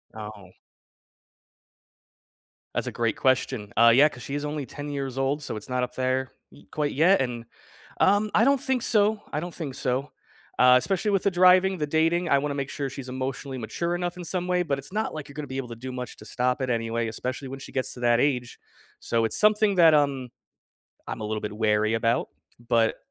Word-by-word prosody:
Oh. 105 -3 -9 2.2
That's - - -2
a - - -2
great 115 -1 -1
question. 130 -5 0
Uh, 115 +1 +7
yeah, 145 +4 +6
'cause 125 -4 -11
she 140 - -5
is 145 0 -3
only 150 -1 -3
10 145 +3 -7
years 135 -2 -4
old, 135 +2 0
so - - -4
it's 105 +4 -8
not 125 0 0
up 125 - -5
there 130 +1 -1 0.2
y - - -17
quite 150 -1 -1
yet, 175 +6 +4
and, 120 -2 -3 0.5
um 205 +2 +3
I 215 - +5
don't 275 -1 +3
think 265 -3 0
so, 210 -1 +2
I - - 0
don't 175 +2 -6
think 145 -6 -6
so. 135 +2 -2 0.5
Uh, 125 0 +7
especially 195 - 0
with 195 -2 +2
the - - +3
driving, 185 +1 +5
the 150 -2 -2
dating, 165 +3 +1
I 140 - +4
wanna 145 0 -2
make 135 -1 -3
sure 140 -2 -3
she's 130 -1 -8
emotionally 130 +1 -4
mature 170 +10 -2
enough 175 0 -3
in 180 - -6
some 180 +1 -3
way, 180 0 +1
but 140 -5 -1
it's 135 - -12
not 215 +2 -2
like 155 -2 -7
you're 140 - -12
gonna 150 -1 -5
be 130 +1 -5
able 135 -2 -3
to 115 - -7
do 130 +3 -7
much 125 -2 -6
to 105 - -13
stop 125 +3 -1
it 130 - -1
anyway, 115 -1 -1
especially 130 +4 -4
when 135 +1 -7
she - - -10
gets 130 -2 -2
to - - -11
that 120 -1 +3
age. 125 -3 0 0.4
So, 115 -1 0
it's 110 - -2
something 210 -1 +3
that, 165 -3 +7
um, 140 -4 +1 0.8
I'm 110 - -5
a - - -3
little 110 0 -2
bit 105 0 -5
wary 110 0 +1
about, 115 +1 +1 0.4
but 115 -2 +3
135 Hz, 220 wpm, -26 LUFS, 125-170 Hz, 2.2 s, Uh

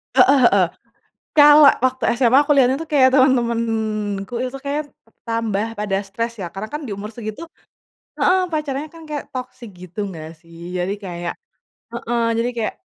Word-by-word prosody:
Heeh 265 +2 +6
heeh. 190 -5 +3 0.7
Kalau 295 0 +8
waktu 260 -1 +2
SMA, 250 +1 +4
aku 295 - +4
lihatnya 265 -1 +4
tuh 325 - -6
kayak, 275 -4 +4
teman-temanku 225 -5 0
itu, 255 +2 -4
kayaknya 290 +1 -3 0.4
tambah 225 -2 -1
pada 205 -2 -2
stres, 230 +3 -4
ya? 185 - -4
Karena 210 +3 -5
kan, 295 - -4
di 205 - -4
umur 210 +2 -7
segit 215 -2 -7 0.8
heeh, 370 +1 +3
pacarannya 300 -1 -3
kan 330 - -13
kayak, 295 -1 -4
toksik 255 -2 -7
gitu, 185 +4 -6
nggak 160 -2 -9
sih? 170 +2 -9
Jadi 180 +2 -1
kayak 175 -2 -5 0.8
heeh. 235 -1 +1
Jadi 235 +1 0
kayak 220 - -1
230 Hz, 160 wpm, -20 LUFS, 200-265 Hz, 0.8 s, Kalau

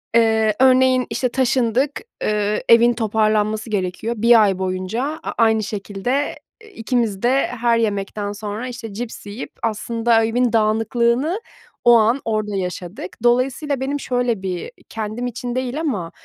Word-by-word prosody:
Eee, 220 -2 +3
örneğin, 255 -1 +4
işte, 240 +3 -1
taşındık. 260 +2 +1 0.2
Eee, 210 0 0
evin 235 +1 +6
toparlanması 215 0 0
gerekiyor. 205 +3 -2
1 230 0 +6
ay 195 -2 +1
boyunca 185 +5 -2 0.2
a - - -3
aynı 220 -1 +3
şekilde, 210 +7 -2 0.3
eee, 435 -1 -16
ikimiz 225 -4 -1
de 260 +3 +3
her 235 -1 +1
yemekten 205 -2 -2
sonra, 210 +3 -5
işte, 235 -4 -7
cips 230 0 -6
yiyip 205 +5 -7
aslında 225 +1 +1
evin 240 +1 +1
dağınıklığını 235 - +1 0.4
o 240 - +8
an, 230 +5 +2
orada 215 -2 -1
yaşadık. 180 0 -5
Dolayısıyla 255 +4 +1
benim 280 +2 -2
şöyle 245 -5 -1
bir 180 - -4 0.2
kendim 220 +2 -4
için 245 0 -5
değil 255 +2 -2
ama, 200 - -2
230 Hz, 140 wpm, -20 LUFS, 210-245 Hz, 0.4 s, o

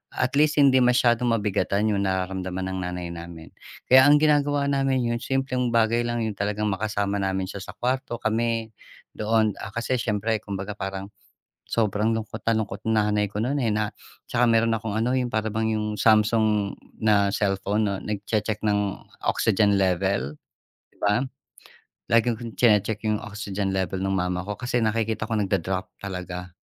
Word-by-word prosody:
at - - 0
least 150 0 +4
hindi 135 -2 +6
masyadong 125 -1 +3
mabigatan 105 -1 0
yung 100 -1 0
nararamdaman 95 0 -2
ng 95 - -3
nanay 90 -1 -4
namin. 85 -1 -9 0.4
Kaya 130 +1 +8
ang 145 - +7
ginagawa 145 -2 +2
namin, 135 -2 +1
yung 120 - -1
simpleng 130 -2 -1
bagay 115 +1 +2
lang, 120 0 -1
yung 110 -3 -3
talagang 105 +1 -1
makasama 100 0 -1
namin 95 -1 -1
siya 100 - -6
sa 95 - -9
kuwarto. 125 -1 -2
Kami, 115 0 0 0.5
doon 110 0 +2
ah, 105 - -6
kasi 120 +2 -1
siyempre 110 -1 -1
kumbaga 100 0 -5
parang 95 -1 -5 0.6
sobrang 110 0 +1
lungkot 110 0 -5
na 115 - +3
lungkot 110 -2 -2
nanay 105 -1 +2
ko 105 +2 -3
no'n, 130 +5 0
eh, 110 - +1
na 105 0 0 0.4
'tsaka 125 0 +2
meron 115 0 +3
akong 110 -1 -5
ano, 120 +3 +1
yung 125 -1 0
para 110 0 0
bang 110 +1 -1
yung 105 0 -2
Samsung 110 -2 +3 0.2
na 100 -2 +3
cellphone 100 +1 0
'no, 100 -1 -1
nagche-check 105 +1 -2
ng 105 -2 +1 0.3
oxygen 100 0 +2
level, 90 -6 0 0.6
'di - - -29
ba? 105 +6 +2 0.8
Laging 115 +1 +3
kong 115 -2 -6
tsine-check 105 -2 +2
yung 105 -1 0
oxygen 100 -1 -4
level 95 0 -1
ng 95 - -1
mama 90 -1 -1
ko. 105 0 -5
Kasi 125 0 -1
nakikita 110 0 0
ko 110 - 0
nagda-drop 95 -2 -1
talaga, 90 -2 -6
105 Hz, 165 wpm, -25 LUFS, 100-115 Hz, 0.8 s, Kaya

